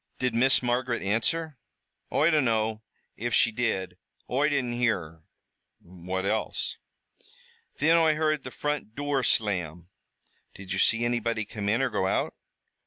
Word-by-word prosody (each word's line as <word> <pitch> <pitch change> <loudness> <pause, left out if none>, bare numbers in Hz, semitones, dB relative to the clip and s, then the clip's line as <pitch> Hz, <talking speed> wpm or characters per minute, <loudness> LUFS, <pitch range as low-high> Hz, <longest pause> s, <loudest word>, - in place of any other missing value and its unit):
"Did 125 -2 0
Miss 130 +3 +3
Margaret 120 0 0
answer?" 135 +8 -1 0.5
"Oi 155 +3 +3
dunno 110 -7 +1 0.4
if 120 +1 -1
she 115 - +4
did, 95 -6 -2 0.3
Oi 140 +4 +2
didn't 135 -4 0
hear 120 -2 +2
her." 80 -1 -13 0.6
"What 95 +2 -5
else?" 110 +2 -2 1.0
"Thin 160 +3 +4
Oi 160 -2 +4
heard 155 -2 0
the 130 - -6
front 145 -5 -3
dure 145 -1 0
slam." 90 -8 -1 0.7
"Did 95 0 -6
you 95 - -1
see 115 +3 +3
anybody 115 -2 -1
come 105 -1 -4
in 115 +5 +2
or 130 - 0
go 95 -3 0
out?" - - 0
115 Hz, 145 wpm, -27 LUFS, 100-135 Hz, 1.0 s, she